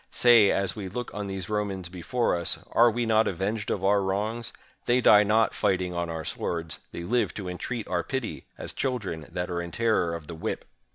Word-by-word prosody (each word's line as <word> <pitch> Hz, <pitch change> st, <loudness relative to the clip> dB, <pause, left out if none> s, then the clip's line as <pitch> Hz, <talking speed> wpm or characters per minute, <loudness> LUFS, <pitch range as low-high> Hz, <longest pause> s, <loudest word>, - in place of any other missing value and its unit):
Say, 120 Hz, -5 st, +6 dB
as 100 Hz, -1 st, +1 dB
we 100 Hz, -3 st, -5 dB
look 120 Hz, +5 st, -5 dB
on 105 Hz, -1 st, -4 dB
these 95 Hz, -2 st, -5 dB
Romans 100 Hz, -4 st, -2 dB
before 95 Hz, +7 st, -1 dB
us, 85 Hz, -1 st, -2 dB
are 120 Hz, +1 st, +6 dB
we 120 Hz, +1 st, -1 dB
not 110 Hz, 0 st, +3 dB
avenged 100 Hz, +4 st, -2 dB
of 95 Hz, -, -1 dB
our 100 Hz, +1 st, +4 dB
wrongs? 110 Hz, +5 st, -2 dB, 0.3 s
They 120 Hz, +1 st, +3 dB
die 105 Hz, -4 st, +7 dB
not 110 Hz, +1 st, +3 dB
fighting 90 Hz, -2 st, 0 dB
on 85 Hz, -1 st, -2 dB
our 80 Hz, -2 st, -4 dB
swords; 80 Hz, -2 st, -3 dB
they 85 Hz, -, -6 dB
live 120 Hz, +7 st, 0 dB
to 100 Hz, -3 st, -5 dB
entreat 110 Hz, +6 st, -4 dB
our 90 Hz, -1 st, 0 dB
pity, 130 Hz, -4 st, -4 dB
as -, -, -6 dB
children 105 Hz, -, -3 dB
that 90 Hz, 0 st, -3 dB
are 85 Hz, 0 st, -1 dB
in 85 Hz, -, -5 dB
terror 105 Hz, -6 st, +1 dB
of 85 Hz, -2 st, -8 dB
the 85 Hz, -, -7 dB
whip!" 80 Hz, -, -4 dB
100 Hz, 210 wpm, -27 LUFS, 90-115 Hz, 0.3 s, die